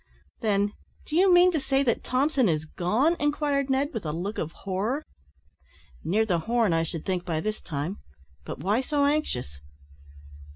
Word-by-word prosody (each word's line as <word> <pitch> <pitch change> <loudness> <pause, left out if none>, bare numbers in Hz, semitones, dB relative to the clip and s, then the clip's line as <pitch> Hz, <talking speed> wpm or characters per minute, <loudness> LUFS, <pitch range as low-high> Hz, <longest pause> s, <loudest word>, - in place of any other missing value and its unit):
"Then, 205 -1 +1 0.3
do 305 - -5
you 375 +2 +5
mean 355 +1 +7
to 320 - 0
say 270 0 +1
that 240 -4 0
Thompson 260 -2 +2
is 155 -1 0
gone?" 220 - +1
Inquired 290 -2 0
Ned, 270 +2 +1
with 225 - -4
a 155 - -2
look 185 +7 -4
of 160 - -3
horror. 200 - -2 1.0
"Near 215 +6 +2
the 180 -6 +1
Horn, 225 +1 +1
I 165 - +2
should 165 -1 -4
think, 185 -2 -1
by 160 -2 -2
this 215 +5 -3
time; 150 +5 -4 0.4
but - - -6
why 205 - +1
so 285 +2 +1
anxious?" 125 - -1
220 Hz, 170 wpm, -26 LUFS, 175-280 Hz, 1.0 s, mean